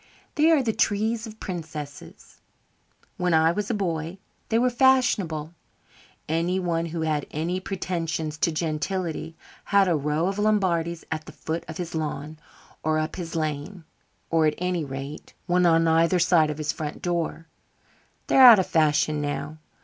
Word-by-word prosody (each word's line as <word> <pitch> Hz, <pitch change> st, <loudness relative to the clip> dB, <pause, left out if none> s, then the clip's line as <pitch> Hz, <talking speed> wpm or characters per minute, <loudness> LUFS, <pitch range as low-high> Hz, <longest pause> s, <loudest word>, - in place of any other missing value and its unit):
"They 310 Hz, +2 st, +3 dB
are 310 Hz, -5 st, +4 dB
the 225 Hz, -3 st, 0 dB
trees 220 Hz, +3 st, 0 dB
of 220 Hz, 0 st, -12 dB
princesses. 155 Hz, -6 st, -8 dB, 0.8 s
When 180 Hz, -2 st, +1 dB
I 160 Hz, +1 st, +4 dB
was 205 Hz, +3 st, -3 dB
a 235 Hz, -, 0 dB
boy 170 Hz, -3 st, -3 dB, 0.3 s
they 225 Hz, -, +2 dB
were 250 Hz, +1 st, +2 dB
fashionable. 210 Hz, -, +2 dB, 0.7 s
Anyone 170 Hz, +1 st, 0 dB
who 165 Hz, 0 st, -4 dB
had 155 Hz, -2 st, -1 dB
any 170 Hz, +4 st, -2 dB
pretensions 165 Hz, -5 st, -3 dB
to 165 Hz, -, +2 dB
gentility 160 Hz, +1 st, -3 dB, 0.3 s
had 200 Hz, -1 st, +4 dB
a 175 Hz, -, +2 dB
row 150 Hz, +2 st, 0 dB
of 195 Hz, +1 st, -2 dB
Lombardies 175 Hz, -6 st, +1 dB
at 155 Hz, -1 st, -4 dB
the -, -, -8 dB
foot 160 Hz, +1 st, -4 dB
of 160 Hz, -, -7 dB
his 175 Hz, -2 st, -5 dB
lawn 155 Hz, -1 st, -4 dB, 0.4 s
or 155 Hz, 0 st, +1 dB
up 155 Hz, 0 st, -2 dB
his 170 Hz, -2 st, -6 dB
lane, 155 Hz, +4 st, -3 dB, 0.5 s
or 160 Hz, -1 st, +3 dB
at 150 Hz, -, 0 dB
any 180 Hz, -2 st, -1 dB
rate 140 Hz, +1 st, -7 dB
one 180 Hz, 0 st, +3 dB
on 165 Hz, 0 st, +4 dB
either 165 Hz, +2 st, +3 dB
side 170 Hz, -3 st, +4 dB
of 150 Hz, -, -4 dB
his 150 Hz, -1 st, -1 dB
front 150 Hz, -1 st, -6 dB
door. 170 Hz, -2 st, -2 dB, 0.8 s
They're 270 Hz, -, +4 dB
out 245 Hz, -4 st, +11 dB
of 190 Hz, -, +1 dB
fashion 150 Hz, -1 st, +2 dB
now. 145 Hz, +1 st, -4 dB
165 Hz, 160 wpm, -25 LUFS, 155-185 Hz, 0.8 s, out